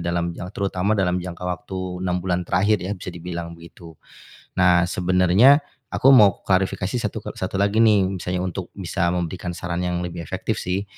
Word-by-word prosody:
dalam 85 0 -1
jang 90 +2 -7
terutama 100 +1 0
dalam 90 -2 +1
jangka 90 0 -7
waktu 90 0 -4
6 90 -1 -1
bulan 90 -1 -1
terakhir 100 +2 +2
ya, 100 +3 -4
bisa 90 -1 -7
dibilang 85 -1 -6
begitu. 85 0 -13 0.7
Nah, 90 -1 +5
sebenarnya 90 - +4 0.2
aku 135 - +4
mau 105 -8 +6
klarifikasi 95 +3 0
satu 105 -3 -4
ke - - -5
satu - - -3
lagi 100 +3 +1
nih, 105 -4 +4
misalnya 90 +1 -2
untuk 95 0 -4
bisa 95 -2 -2
memberikan 90 0 -3
saran 85 0 -4
yang 90 0 -2
lebih 85 -1 -6
efektif 85 - -3
sih. 95 +2 -2
90 Hz, 175 wpm, -22 LUFS, 90-95 Hz, 0.7 s, mau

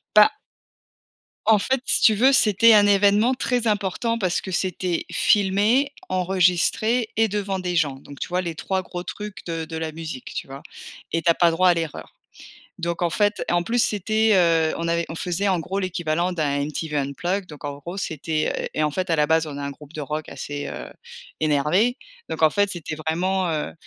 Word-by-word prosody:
Bah 210 0 +7 1.1
en 215 -2 +5
fait, 260 +4 0
si - - +2
tu 220 - +6
veux, 260 +6 +5
c'était 225 -2 +5
un 205 -1 +6
évènement 205 +4 +4
très 245 -2 -1
important 210 +3 0
parce 185 -5 0
que 190 - -7
c'était 180 -1 -2
filmé, 210 +8 +2 0.2
enregistré 185 +5 +1
et 225 0 +4
devant 200 -2 -2
des 180 -1 -3
gens 145 -5 +1
donc 140 +1 -13
tu - - -3
vois 180 +1 -1
les 170 -3 -5
3 190 +3 -2
gros 175 0 -6
trucs 210 0 -7
de 165 -2 -3
de 160 - -8
la 160 -1 -3
musique, 155 -5 -7
tu - - -4
vois? 135 +1 -9 0.5
Et 165 - 0
tu 170 - +1
as 170 - +6
pas 170 0 +3
droit 180 +3 +3
à 175 - +6
l'erreur 165 -3 -5 0.6
donc, 170 0 -3
en 170 - +2
fait 205 +6 +1
et - - 0
en 175 0 +2
plus, 235 +5 +1
c'était, 215 +2 +1
heu, 165 -3 +3
on 165 0 -2
avait 170 0 +1
on 165 - -5
faisait 180 +4 -2
en 185 -3 +2
gros 185 +5 -4
l'équivalent 175 -2 -1
d'un 145 -4 -1
MTV 150 0 -4
Unplugged 175 +8 -2
donc, 150 -2 -12
en 145 -1 -4
gros, 175 +6 -8
c'était, 155 -2 -2
heu, - - -3
et 155 - 0
en 150 - +1
fait 185 +4 -3
à 165 - +2
la 150 -1 +3
base 160 0 +2
on 145 -2 -7
a - - -5
un 140 - -3
groupe 150 +2 -13
de 155 - -6
rock 150 +2 -4
assez, 145 0 -6
heu, - - -7 0.5
énervé 155 - +2 0.3
donc - - -4
en 155 - +6
fait 205 +2 +1
c'était 160 -4 -5
vraiment, 175 +4 -1
heu, 155 -2 -2
175 Hz, 210 wpm, -23 LUFS, 160-205 Hz, 1.1 s, Bah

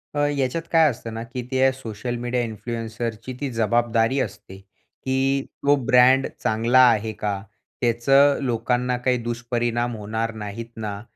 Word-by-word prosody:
अ, - - 0
याच्यात 140 +2 -1
काय 160 -2 +5
असतं 115 -3 -6
ना, 115 +1 -5
की 125 +2 -6
ते 130 0 +3
सोशल 120 -1 -5
मीडिया 120 0 0
इन्फ्लुएन्सरची 115 +1 -5
ती 140 - -2
जबाबदारी 115 +2 +1
असते, 100 -2 -12
की 130 +7 -3 0.2
"तो 145 +1 +5
ब्रँड 130 +1 +5 0.2
चांगला 115 +4 +3
आहे 110 0 -1
का? 100 -2 -3 0.4
त्याचं 135 +4 +4
लोकांना 125 0 0
काही 125 0 +1
दुष्परिणाम 120 0 -2
होणार 110 +2 -3
नाहीत 105 +3 -6
ना?" 105 -2 -5
120 Hz, 140 wpm, -23 LUFS, 115-130 Hz, 0.4 s, काय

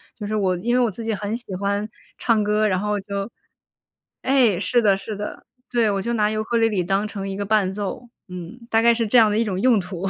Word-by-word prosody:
就 210 -3 -6
是 215 - -2
我 185 -3 +1
因 240 +7 0
为 250 - +4
我 225 - +1
自 230 - -8
己 225 - 0
很 210 +3 -3
喜 205 -6 -7
欢 200 +2 -2 0.3
唱 220 -3 +2
歌， 210 +1 +2
然 185 -2 +1
后 210 0 -1
就 200 +2 -5 0.9
哎， 250 -9 +3
是 240 +3 +2
的 200 -3 +3
是 210 +2 -6
的。 205 +1 -7 0.2
对， 235 -3 +2
我 195 -1 -1
就 235 - -2
拿 210 -2 +2
尤 215 0 -1
克 235 +1 -1
里 225 0 +4
里 190 -4 0
当 195 +3 0
成 195 -2 -6
一 195 - -4
个 200 - -2
伴 205 -3 +2
奏， 210 +4 -5 0.2
嗯， 180 +6 -8
大 225 0 +3
概 235 0 +5
是 230 -1 -1
这 245 - +4
样 220 -2 +6
的 210 - 0
一 230 - +2
种 190 -2 -2
用 240 -3 +4
途。 185 +1 -4
210 Hz, 275 characters per minute, -22 LUFS, 195-230 Hz, 0.9 s, 样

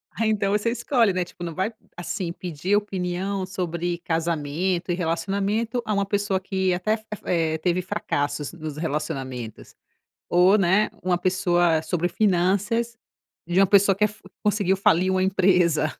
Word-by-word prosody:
Aí 225 0 +1
então 200 -2 +1
você 210 +3 +1
escolhe, 235 -3 +2
né, 180 -1 0
tipo 175 - -11
não 170 -2 -4
vai 190 +6 -2 0.2
assim 175 0 -4
pedir 175 +2 -2
opinião 190 -1 -2
sobre 175 -2 -3
casamento 170 +2 -1
e - - +1
relacionamento 200 +7 -1
a 215 - -1
uma 200 -1 +1
pessoa 200 -1 0
que 190 -1 0
até 215 +5 0
fe 220 - -20 0.2
eh, 160 -2 +1
teve 180 +2 0
fracassos 145 -4 -2
nos 155 -3 -7
relacionamentos, 135 -7 -4 0.5
ou, 180 +3 +5
né, 195 +3 +3
uma 180 -1 +1
pessoa 175 -3 +2
sobre 175 +2 -1
finanças, 205 +5 +1 0.5
de 175 +2 0
uma 195 - +6
pessoa 195 0 +4
fa 210 - +4
que 210 - -9 0.3
conseguiu 200 -2 +2
falir 185 -1 +3
uma 185 0 +1
empresa. 180 -5 +3
185 Hz, 155 wpm, -24 LUFS, 170-200 Hz, 0.5 s, uma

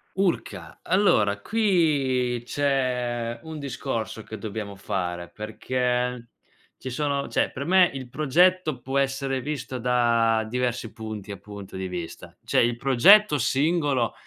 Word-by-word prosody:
Urca, 190 -2 -2
allora, 105 - +2
qui 145 - +1
c'è 125 -3 -1
un 160 -1 -7
discorso 125 -5 -4
che 110 +1 -8
dobbiamo 105 -2 -5
fare, 90 -3 -4
perché 125 +2 -2 0.5
ci 130 - -6
sono 140 +1 -1
cioè, - - 0
per 140 - -5
me 185 +1 +5
il 130 -2 -7
progetto 155 +1 +2
può 135 +3 -3
essere 135 -1 0
visto 130 -2 -4
da 115 -2 +2
diversi 120 -1 -2
punti, 110 -2 -7
appunto, 100 0 -9
di 95 - -3
vista. 90 -2 -7
C'è - - +1
il 120 0 +1
progetto 150 - +6
singolo, 140 -2 +1
125 Hz, 125 wpm, -25 LUFS, 115-140 Hz, 0.5 s, progetto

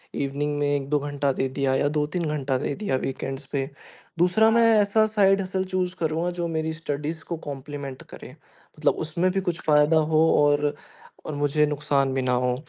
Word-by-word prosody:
Evening 145 +1 -2
में 145 - +1
1-2 145 +1 0
घंटा 145 -1 -1
दे 130 - -1
दिया 135 0 0
या 145 - +2
2-3 155 +3 -1
घंटा 135 -2 -1
दे 140 - -2
दिया 200 -11 -2
वीकेंड्स 135 +1 -4
पे। 135 -1 -2 0.5
दूसरा, 180 +6 +4
मैं 230 0 +5
ऐसा 205 +2 +3
साइड 195 -2 +3
हसल 190 0 -2
चूज़ 180 -1 -1
करूँगा 165 +2 0
जो 170 - 0
मेरी 160 -1 -2
स्टडीज़ 155 0 -4
को 170 - -5
कॉम्प्लीमेंट 140 -1 -7
करे। - - -10
मतलब - - -4
उसमें 170 +4 0
भी 195 +1 -1
कुछ 175 -3 -2
फायदा 150 +1 +4 0.2
हो 155 +1 +5 0.2
और 145 0 +2 0.5
और 155 - -4
मुझे 145 +1 +2
नुकसान 145 -2 0
भी 135 - 0
ना 130 0 0
हो। 125 0 +1
150 Hz, 185 wpm, -25 LUFS, 140-175 Hz, 0.5 s, मैं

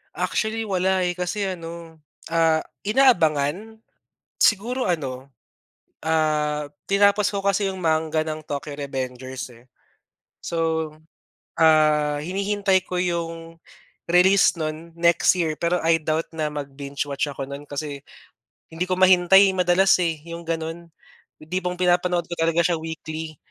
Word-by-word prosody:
Actually, 225 0 -1
wala, 190 -2 +1
eh. 175 - 0
Kasi 180 +3 -3
ano, 165 -2 -10 0.3
ah, 160 -1 +3 0.2
inaabangan? 205 - +2 0.6
Siguro 240 +5 +2
ano, 135 -6 -3 0.7
ah, 150 -2 0 0.2
tinapos 200 +1 +3
ko 200 - -2
kasi 200 +1 +1
'yong 190 -1 -4
manga 160 -1 +1
ng 155 -1 -5
Tokyo 145 0 -5
Revengers, 130 -2 -5
eh. 120 0 -18 0.8
So, 160 -1 -1 0.7
ah, 155 -2 +3
hinihintay 195 +1 0
ko 180 -1 -2
'yong 165 -1 -4 0.5
release 180 +3 +5
no'n 155 +2 -5
next 170 +1 +4
year, 160 -4 -1
pero 170 +1 0
I 165 0 +4
doubt 155 +1 -2
na 155 -2 -2
mag-binge-watch 140 0 -4
ako 135 0 -6
no'n 140 +1 -8
kasi 145 0 -5 0.7
hindi 180 +3 -3
ko 185 - 0
mahintay 185 +1 +6
madalas, 180 +1 +4
eh, 165 -2 0
'yong 170 0 -7
gano'n. 165 +1 -4 0.6
Yung 155 - -24
tipong 180 -1 -2
pinapanood 180 -1 +2
ko 175 - -6
talaga 165 +1 +2
siya 170 -1 +1
weekly. 160 -1 -6
165 Hz, 130 wpm, -23 LUFS, 155-185 Hz, 0.8 s, mahintay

